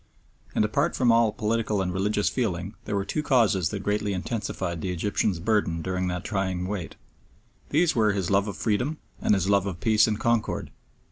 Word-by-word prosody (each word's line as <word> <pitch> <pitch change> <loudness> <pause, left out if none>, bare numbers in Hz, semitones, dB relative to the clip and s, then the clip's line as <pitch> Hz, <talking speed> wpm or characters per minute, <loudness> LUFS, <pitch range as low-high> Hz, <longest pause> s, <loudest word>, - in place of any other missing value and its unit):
And 105 - +3
apart 140 +10 0
from 125 -3 +3
all 115 -1 +4
political 110 -1 -1
and 90 -2 -1
religious 105 +2 0
feeling 95 -6 -1
there - - -2
were 100 -1 -1
two 155 - -1
causes 110 - +3
that 100 +1 -5
greatly 105 0 0
intensified 95 -4 -3
the 95 - -2
Egyptian's 95 +1 0
burthen 85 -3 0
during 90 0 -1
that 90 0 -3
trying 95 -4 -2
wait. 95 -3 -4 0.7
These 165 +3 +2
were 110 -3 +3
his 95 -3 -2
love 100 +1 +3
of 100 - -5
freedom 125 +8 0 0.2
and 105 - +3
his 95 -1 0
love 100 -1 +3
of 90 -3 -5
peace 110 +1 +4
and 105 -1 -1
concord. 115 -1 0
105 Hz, 190 wpm, -26 LUFS, 95-110 Hz, 0.7 s, all